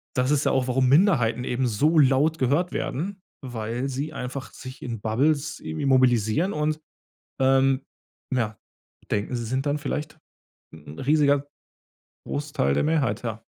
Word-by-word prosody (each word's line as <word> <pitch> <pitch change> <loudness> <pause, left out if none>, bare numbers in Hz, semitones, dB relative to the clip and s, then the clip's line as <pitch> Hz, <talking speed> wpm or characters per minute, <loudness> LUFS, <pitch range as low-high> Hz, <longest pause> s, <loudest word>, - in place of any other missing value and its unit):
das 130 +2 +1
ist 150 0 +2
ja - - +3
auch, 130 -1 +1
warum 130 0 +2
Minderheiten 135 - +3
eben 125 +1 0
so 150 +9 +2
laut 145 +4 +4
gehört 145 +8 +1
werden, 190 +7 -3 0.2
weil 120 +1 -3
sie 140 +4 -4
einfach 130 0 -6
sich 130 0 -10
in 115 -4 -5
Bubbles 140 +7 0
irgendwie 80 - -4
mobilisieren 130 - +3
und, 150 0 -1 0.6
ähm, 135 0 +3 0.5
ja, 110 -4 -1 0.5
denken, 105 +4 -1
sie 120 - -3
sind 130 +5 -2
dann 145 +1 +1
vielleicht 150 +2 -4 0.6
'n 75 0 -11
riesiger 145 0 +2 0.8
Großteil 145 - -1
der - - +1
Mehrheit, 140 -9 +1
ja. 115 -1 -5
135 Hz, 145 wpm, -25 LUFS, 120-150 Hz, 0.8 s, laut